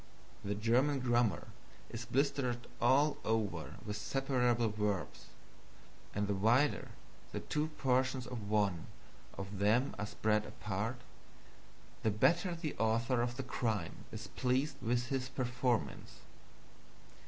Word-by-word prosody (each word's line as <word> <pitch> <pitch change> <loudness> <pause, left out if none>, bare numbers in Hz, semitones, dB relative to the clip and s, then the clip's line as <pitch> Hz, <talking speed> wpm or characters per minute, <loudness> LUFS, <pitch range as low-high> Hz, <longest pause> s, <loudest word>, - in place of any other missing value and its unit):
The 100 0 -1
German 125 +7 +3
grammar 120 -4 +1 0.4
is 115 +1 -5
blistered 125 -3 0 0.2
all 140 +5 +4
over 110 -2 -1
with 105 0 -3
separable 125 -1 +1
verbs; 105 -3 -2 0.9
and 105 0 0
the 100 - +1
wider 115 +9 +3 0.5
the - - -2
two 150 +1 -1
portions 130 0 +1
of 115 -4 -6
one 100 -6 +1 0.5
of 100 0 -5
them 115 +7 +3
are 105 - -2
spread 105 0 +1
apart, 110 +5 -3 1.0
the 110 - +2
better 170 - +3
the 165 -3 -4
author 115 +2 +2
of 120 0 -2
the 135 - -2
crime 115 -4 -2
is - - -6
pleased 130 +3 0
with 120 +1 0
his 130 -1 -1
performance. 125 -2 -1
120 Hz, 120 wpm, -35 LUFS, 105-130 Hz, 1.0 s, all